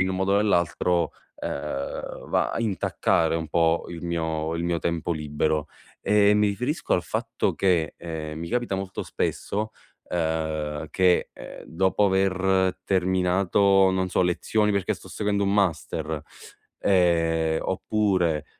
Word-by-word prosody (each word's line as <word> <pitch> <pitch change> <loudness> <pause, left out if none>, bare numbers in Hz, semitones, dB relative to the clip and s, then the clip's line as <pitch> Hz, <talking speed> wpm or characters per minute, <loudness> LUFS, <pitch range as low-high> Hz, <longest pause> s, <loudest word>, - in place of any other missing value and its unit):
in 95 - +2
un 95 - -2
modo 95 +1 +1
o - - +4
nell'altro, 85 -3 +1 0.3
ehm, 70 -1 -5
va - - +1
a - - -2
intaccare 95 -6 +1
un 80 -2 -2
po' 85 0 +2
il 85 0 -7
mio 80 -1 -2
il 85 - -2
mio 85 -1 0
tempo 85 0 -2
libero. 75 0 -1 0.3
Ehm, 105 0 +4
mi 105 - +4
riferisco 125 - -2
al 90 - +1
fatto - - -2
che, 90 -5 +1
ehm, 80 -2 -6
mi 85 +1 -5
capita 120 -4 -1
molto 95 0 -4
spesso, 110 +2 -2 0.4
uhm, 80 -2 -2
che, 90 0 +2
ehm, - - -10
dopo 95 +4 +1
aver 95 -1 +2
terminato, 95 +1 +3
non 95 0 0
so, 90 - +1
lezioni 105 +4 +1
perché 100 -2 0
sto - - -14
seguendo 100 -1 -1
un 100 0 +1
master, 80 -5 -1 0.6
ehm, 85 -4 +2
oppure 95 -6 0
90 Hz, 140 wpm, -25 LUFS, 80-95 Hz, 0.6 s, o